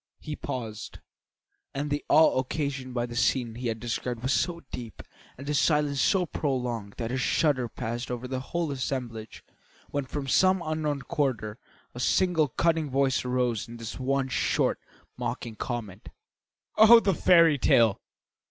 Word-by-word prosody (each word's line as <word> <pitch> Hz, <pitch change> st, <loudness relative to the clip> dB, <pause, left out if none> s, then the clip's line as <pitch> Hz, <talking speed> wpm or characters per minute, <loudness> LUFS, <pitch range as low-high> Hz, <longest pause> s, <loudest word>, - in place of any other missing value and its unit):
He 155 Hz, -, -6 dB
paused, 115 Hz, -6 st, -6 dB, 0.8 s
and 145 Hz, +1 st, -3 dB
the 145 Hz, -, -1 dB
awe 155 Hz, -3 st, +5 dB
occasioned 130 Hz, -1 st, -3 dB
by 120 Hz, -1 st, 0 dB
the 120 Hz, -1 st, -8 dB
scene 120 Hz, -1 st, +1 dB
he 120 Hz, +2 st, -4 dB
had 115 Hz, -1 st, -2 dB
described 120 Hz, +1 st, -4 dB
was 130 Hz, +2 st, +1 dB
so 170 Hz, -2 st, 0 dB
deep 115 Hz, -3 st, -8 dB, 0.3 s
and 135 Hz, -, -9 dB
the 150 Hz, -, -2 dB
silence 150 Hz, -2 st, +2 dB
so 190 Hz, -3 st, +3 dB
prolonged 125 Hz, -10 st, -3 dB
that 115 Hz, -1 st, -3 dB
a 130 Hz, -, -1 dB
shudder 130 Hz, -2 st, +1 dB
passed 120 Hz, +3 st, -5 dB
over 125 Hz, 0 st, -4 dB
the 130 Hz, 0 st, -3 dB
whole 165 Hz, +3 st, -3 dB
assemblage 125 Hz, -5 st, -5 dB, 0.5 s
when 145 Hz, -1 st, -2 dB
from 135 Hz, +1 st, -5 dB
some 185 Hz, +6 st, +3 dB
unknown 155 Hz, -3 st, -2 dB
quarter 125 Hz, -9 st, -2 dB, 0.3 s
a 120 Hz, -, -8 dB
single 160 Hz, +4 st, +2 dB
cutting 160 Hz, +2 st, 0 dB
voice 135 Hz, 0 st, +1 dB
arose 125 Hz, -2 st, -1 dB
in 120 Hz, +1 st, -9 dB
this 115 Hz, +1 st, -7 dB
one 135 Hz, +1 st, 0 dB
short, 130 Hz, -, 0 dB, 0.4 s
mocking 115 Hz, -2 st, -4 dB
comment: 110 Hz, -6 st, -5 dB, 0.7 s
"Oh, 220 Hz, +2 st, +9 dB
the 195 Hz, -4 st, +1 dB
fairy 165 Hz, -4 st, +5 dB
tale!" 115 Hz, -4 st, +4 dB
130 Hz, 155 wpm, -27 LUFS, 120-150 Hz, 0.8 s, Oh